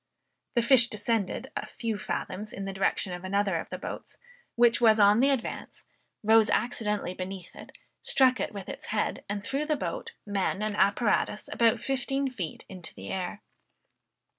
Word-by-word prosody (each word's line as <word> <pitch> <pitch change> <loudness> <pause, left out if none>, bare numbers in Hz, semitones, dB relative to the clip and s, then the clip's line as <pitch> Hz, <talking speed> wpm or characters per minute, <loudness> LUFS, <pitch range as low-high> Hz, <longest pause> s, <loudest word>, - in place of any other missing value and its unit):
The 235 - +3
fish 240 0 +7
descended 215 -2 -1
a - - -3
few 225 -3 -3
fathoms 210 0 -4
in 195 - -5
the 195 - -4
direction 190 -1 0
of 180 0 -7
another 195 -1 +1
of - - -5
the - - -5
boats, - - -8 0.4
which 235 0 +4
was 220 -2 +6
on 205 +1 +6
the 270 +3 +4
advance, 270 -4 -3 0.4
rose 220 0 +5
accidentally 210 -6 0
beneath 185 0 -7
it, - - -12 0.2
struck 255 -1 +3
it - - -2
with 200 -3 -7
its - - -7
head, 210 -1 -1
and 205 0 -3
threw 275 +7 -1
the 305 0 0
boat, 465 +10 -4
men, 200 0 -1
and 215 -1 -1
apparatus 210 +1 +1
about 230 -1 +3
fifteen 270 +1 -1
feet 180 -10 -6
into 185 -3 -9
the - - -7
air. 190 +3 -4
210 Hz, 170 wpm, -28 LUFS, 195-240 Hz, 0.4 s, fish